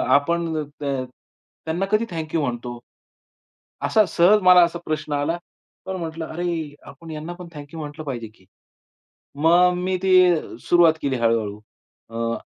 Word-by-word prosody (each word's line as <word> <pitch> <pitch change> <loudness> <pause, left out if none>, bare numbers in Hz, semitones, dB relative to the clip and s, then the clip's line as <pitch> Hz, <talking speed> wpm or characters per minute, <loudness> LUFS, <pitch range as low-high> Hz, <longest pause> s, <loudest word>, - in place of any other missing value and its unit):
आपण 160 +1 0 0.2
त - - -5 0.8
त्यांना 170 +4 -1
कधी 215 +2 +3
थँक 160 -2 -5
यू 160 - +2
म्हणतो? 120 -2 -4 1.1
असा 215 -1 +4
सहज 195 +4 +4
मला 180 -1 +8
असा 170 0 -5
प्रश्न 155 -1 -3
आला. 145 +4 0 0.5
पण 190 0 -4
म्हटलं, 165 -1 -5
"अरे, 165 -3 -4
आपण 160 +4 -11
यांना 155 +3 -6
पण 175 0 -10
थँक 145 -1 -8
यू 160 - -7
म्हंटलं 150 +1 -7
पाहिजे 120 -5 -4
की." 95 - -25 1.0
मग 180 +2 +5
मी 185 +1 -1
ती 190 - +2 0.5
सुरुवात 170 -2 +5
केली 140 -2 0
हळू-हळू. 115 -3 0 0.5
अ, 115 0 -2
160 Hz, 150 wpm, -22 LUFS, 145-175 Hz, 1.1 s, मला